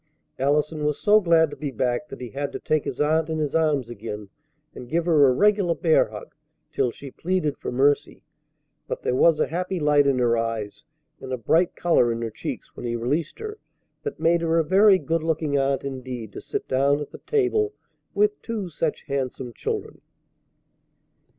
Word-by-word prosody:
Allison 150 +3 +1
was 150 -1 0
so 210 0 +5
glad 165 -4 +4
to - - -7
be 150 - -4
back 130 +2 -1
that - - -10
he 125 - -6
had 140 +2 -4
to - - -4
take 155 -1 0
his 130 - -5
aunt 155 +2 +2
in 160 - -1
his 150 -2 -2
arms 150 -6 +1
again 105 -3 -7 0.4
and 120 - -10
give 165 +1 0
her 155 -5 +5
a - - +5
regular 200 +3 +3
bear 160 0 +3
hug 105 -1 -10 0.4
till 130 -2 +1
she 135 +3 -10
pleaded 175 -3 -1
for - - -4
mercy, 140 +3 +1 0.6
but - - -5
there - - 0
was 160 +5 +4
a - - +3
happy 180 +2 -3
light 145 -2 +4
in 135 -2 +2
her 120 -2 +3
eyes 115 +3 -3 0.3
and 130 - -8
a 130 - -1
bright 165 +10 +2
color 145 -9 +3
in 115 0 -3
her 115 - -3
cheeks - - -7
when - - -8
he 120 - -2
released 140 +8 -2
her 430 0 -7 0.4
that 440 - -5
made 170 +1 +3
her 165 0 +1
a 165 - +4
very 195 +4 +5
good 165 -2 -1
looking 155 -2 -1
aunt 135 0 +1
indeed 130 -5 -6
to - - -7
sit - - -4
down 140 +2 +2
at 145 - -6
the - - -10
table 425 0 +1 0.4
with 420 0 +2
two 215 -6 -4
such 160 -1 -2
handsome 130 -3 -4
children. - - -4
150 Hz, 195 wpm, -24 LUFS, 130-170 Hz, 0.6 s, so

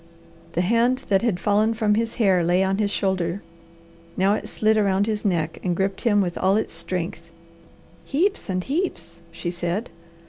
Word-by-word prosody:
The 175 - +1
hand 235 +6 +2
that 195 -1 +3
had 225 -7 0
fallen 210 +3 +2
from 215 -2 +2
his 225 +1 -1
hair 190 -6 +3
lay 175 +3 +3
on 190 +1 0
his 205 -1 +1
shoulder. 190 -2 -1 0.7
Now 195 +2 +3
it - - -3
slid 220 0 +2
around 200 -2 +2
his 215 -1 -2
neck, 165 -6 -1
and 180 -2 0
gripped 195 +2 -1
him 205 -4 +3
with 175 -3 -2
all 190 +1 +3
its 220 - -2
strength. 170 0 -5 0.7
"Heaps 360 - 0
and 185 -1 -1
heaps!" 180 - -3
she 170 +1 -4
said. 175 +6 -3
195 Hz, 175 wpm, -23 LUFS, 175-220 Hz, 0.7 s, that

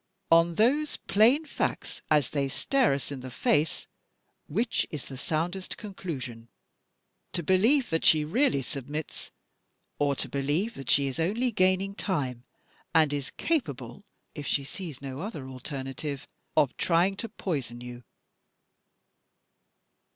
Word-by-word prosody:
On 165 0 +6
those 280 - +3
plain 245 +10 +4
facts, 290 - -3
as 150 -4 +3
they 140 -2 0
stare 265 - +2
us 140 +1 -3
in 140 - -4
the 130 0 -7
face, 145 +4 +1 0.6
which 225 +9 0
is 150 -4 -6
the 135 - -8
soundest 170 +7 -2
conclusion? 140 - -6 0.9
To 175 - -1
believe 225 - +3
that 160 - +1
she 155 -1 +6
really 170 - +2
submits 145 +3 -5 0.7
or 145 -1 +2
to - - -2
believe 145 +11 0
that 135 - -8
she 140 - +5
is 135 +3 -3
only 220 +9 +1
gaining 190 -1 +2
time, 130 - -2 0.5
and 155 -3 +5
is 140 -1 -2
capable 145 - -2 0.3
(if 145 -3 -6
she 140 - +1
sees 155 -3 -7
no 135 0 -5
other 165 - -5
alternative) 135 +2 -5 0.3
of 145 -5 +4
trying 180 +3 +3
to 230 - -4
poison 140 - -3
you?" 125 0 -8
155 Hz, 135 wpm, -28 LUFS, 135-195 Hz, 0.9 s, On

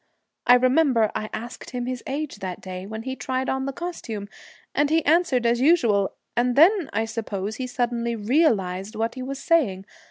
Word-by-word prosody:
I 245 - +9
remember 255 -3 +3
I 215 0 -3
asked 235 +2 -7
him 245 -1 -4
his 250 -1 -4
age 285 -2 -3
that 185 -3 -5
day, 185 0 -7
when 220 +1 -6
he 260 +1 -4
tried 260 0 -2
on 265 0 -1
the - - -1
costume, 255 - -6 0.4
and 290 0 +2
he 320 0 +2
answered 295 -6 +3
as 235 +1 +2
usual, 235 - +3 0.2
and 245 +1 +1
then, 350 +2 +5
I 225 +2 0
suppose, 215 -2 -4
he 255 - -3
suddenly 240 -2 -1
realized 210 - +1
what 225 +1 -1
he 255 - -7
was 270 +2 -4
saying. 250 - +1
245 Hz, 185 wpm, -24 LUFS, 215-275 Hz, 0.4 s, I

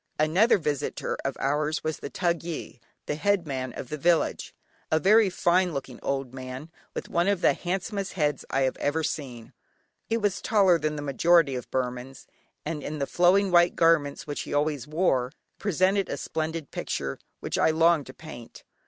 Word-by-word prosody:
Another 175 +11 +4
visitor 150 -5 -2
of - - -3
ours 150 +3 0
was 155 -1 -2
the - - -7
thugyi, 170 -6 -3 0.3
(the - - -2
head 195 +3 +1
man 130 -3 -3
of 125 - -7
the 150 - -5
village), 170 +2 +1 0.3
a 155 - +3
very 210 +3 +5
fine 180 0 +2
looking 135 -2 -6
old 135 -2 -2
man 130 +4 -7 0.2
with - - -4
one 170 +2 +1
of 200 -3 +1
the - - +5
handsomest 195 +2 -3
heads 150 -6 0
I 135 - 0
have 130 -1 0
ever 160 +3 0
seen. 125 -7 -5 0.5
He 225 - +1
was 205 -3 -1
taller 190 -6 +4
than 150 0 -1
the 145 - -5
majority 150 +1 +3
of 125 -1 -5
Burmans, 125 +1 -4 0.4
and 155 -1 -3
in 155 +2 -5
the 140 - -1
flowing 185 +5 +3
white 175 0 +5
garments 165 -4 +2
which 145 -1 -4
he - - -4
always 145 -3 0
wore, 150 -6 +1 0.3
presented 195 0 +1
a - - -3
splendid 160 -1 -4
picture 70 -1 -3 0.2
which - - -3
I - - +4
longed 165 -1 +3
to 130 - -9
paint. 120 -8 -11
155 Hz, 180 wpm, -26 LUFS, 140-175 Hz, 0.5 s, very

